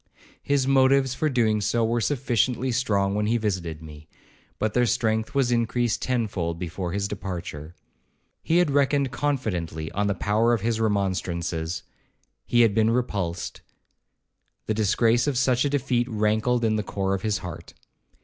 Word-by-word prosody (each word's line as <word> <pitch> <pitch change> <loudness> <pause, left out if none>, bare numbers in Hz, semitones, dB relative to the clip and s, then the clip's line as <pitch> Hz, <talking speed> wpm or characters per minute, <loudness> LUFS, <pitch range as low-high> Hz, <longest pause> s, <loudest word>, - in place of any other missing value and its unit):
His 140 -2 +1
motives 135 -1 +4
for 155 +3 0
doing 110 -5 +1
so 115 +3 +1
were 115 +1 0
sufficiently 125 0 0
strong 100 -6 +1
when 105 +1 0
he 115 +2 +2
visited 90 -7 -3
me, 75 0 -12 0.5
but 110 -1 -1
their 125 -1 +3
strength 110 -2 0
was 135 -3 +2
increased 120 0 0
tenfold 100 -10 -1
before 90 +1 -4
his 100 +2 -1
departure. 90 -5 -6 0.7
He 165 - +1
had 175 -4 +3
reckoned 140 -1 +2
confidently 90 - -2
on 105 +1 0
the 100 - 0
power 110 +5 +2
of 110 - -5
his 115 +1 0
remonstrances; 90 -5 -1 0.6
he 120 - +4
had 115 -3 +4
been 110 +1 +3
repulsed; 100 -8 -2 1.0
the 110 - 0
disgrace 115 +4 +2
of 140 -4 0
such 130 0 +2
a - - +1
defeat 130 -3 0
rankled 110 +2 +1
in 110 -1 +1
the - - 0
core 95 -1 -2
of 95 - -2
his 105 -1 0
heart. 85 -1 -9
110 Hz, 160 wpm, -25 LUFS, 95-125 Hz, 1.0 s, motives